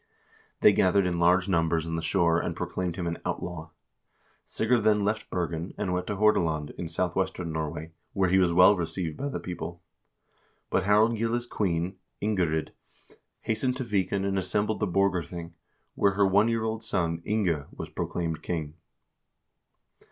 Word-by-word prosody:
They - - +7
gathered 95 +1 +3
in 85 -1 -1
large 90 +2 +4
numbers 80 -3 +1
on 80 0 -3
the 80 - -2
shore 85 -1 +2
and - - -3
proclaimed 90 -2 -3
him 90 -2 -3
an 85 0 -3
outlaw. 85 -2 -4 0.8
Sigurd 115 0 +1
then 105 -1 +3
left 105 +1 -1
Bergen 85 -1 -3
and 90 - -1
went 90 0 -2
to 105 - -2
Hordaland, 85 -8 +2
in 90 - -6
southwestern 90 0 -1
Norway, 80 0 -4 0.2
where 95 -1 +2
he 95 - +5
was 90 -2 +3
well 90 +4 +7
received 85 -2 -3
by 140 - -3
the - - -4
people. 85 0 -6 0.9
But 95 - +1
Harald 110 +3 +4
Gille's 115 +1 0
queen, 95 -4 -1 0.2
Ingerid, 90 -7 0 0.7
hastened 125 +3 -1
to 130 - -2
Viken 100 -3 0
and 95 0 0
assembled 105 +3 -1
the 105 - 0
Borgarthing, 90 -3 -1 0.4
where 100 -1 +2
her 100 0 +3
one 100 +3 +4
year 115 -1 0
old 110 0 -2
son, 85 -6 -1
Inge, 90 -9 0
was - - -7
proclaimed 80 -3 -3
king. 80 -4 -3
90 Hz, 160 wpm, -27 LUFS, 85-105 Hz, 0.9 s, They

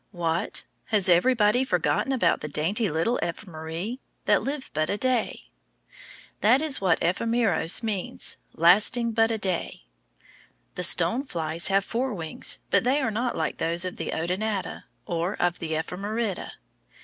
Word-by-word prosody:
What? 170 -3 -1 0.2
Has 210 -4 +1
everybody 215 +6 +4
forgotten 180 - 0
about 230 -11 +2
the 150 - -4
dainty 180 +9 0
little 165 +10 0
ephemeræ, 170 +5 -5 0.3
that - - +4
live 275 0 -4
but 155 +1 0
a 200 - 0
day? 255 0 0 1.0
That 240 +5 +5
is 300 -6 -1
what 180 -4 +3
ephemeros 200 0 +1
means, 205 -5 -1 0.2
lasting 215 +8 +4
but 225 0 +3
a 225 - 0
day. 185 - -2 0.9
The 180 - -4
stone 175 +9 +4
flies 165 - -3
have 195 0 +2
four 245 0 -2
wings, 160 -3 -2
but - - +4
they 260 +4 +2
are 260 -6 0
not 240 +3 -1
like 160 -1 -2
those 170 +2 -1
of 185 - -5
the - - -4
Odonata, 190 +5 -2 0.2
or 170 +2 -2
of 175 0 +1
the 160 -1 -3
Ephemerida. 200 +6 -3
195 Hz, 150 wpm, -26 LUFS, 170-230 Hz, 1.0 s, That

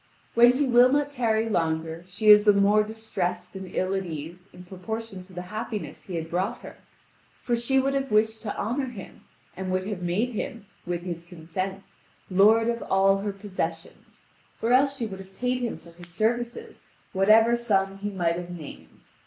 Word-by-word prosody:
When 240 +1 +7
he 285 +3 +1
will 250 0 +6
not 290 0 +1
tarry 225 -4 +1
longer 165 -4 -1
she 210 +4 0
is 210 0 +9
the 210 -1 +6
more 200 +1 +4
distressed 190 -5 -4
and 190 -1 -6
ill 185 +1 -1
at 195 0 -1
ease 170 +2 -8
in 180 - -12
proportion 195 +2 -6
to 185 - -18
the 180 0 -5
happiness 215 -1 -5
he 185 - -7
had 165 -1 -3
brought 190 +8 -2
to - - -7
her, - - -16 0.7
for 240 - +1
she 240 +3 +1
would 270 +1 +1
have 275 0 -1
wished 220 +1 +2
to 210 -3 -5
honour 255 +6 -1
him, 210 -6 -11 0.3
and 185 0 -5
would 185 0 -1
have 205 -4 -4
made 180 +8 0
him, 225 -1 -5 0.2
with 175 -1 -2
his 170 -2 -5
consent, 180 +3 -6 0.4
lord 215 +4 +5
of 235 0 -1
all 195 +1 +4
her 205 +1 -2
possessions, 185 -4 -6 0.3
or 230 +2 +1
else 275 +2 +4
she 235 - -2
would 195 -3 -7
have 190 0 -13
paid 250 0 0
him 240 - -2
for 170 - -16
his 175 +1 -14
services 235 +6 -2 0.3
whatever 215 +4 +5
sum 195 -5 0
he 205 +1 -3
might 170 -4 0
have 175 0 -6
named. 170 -4 -11
200 Hz, 195 wpm, -26 LUFS, 180-230 Hz, 0.7 s, is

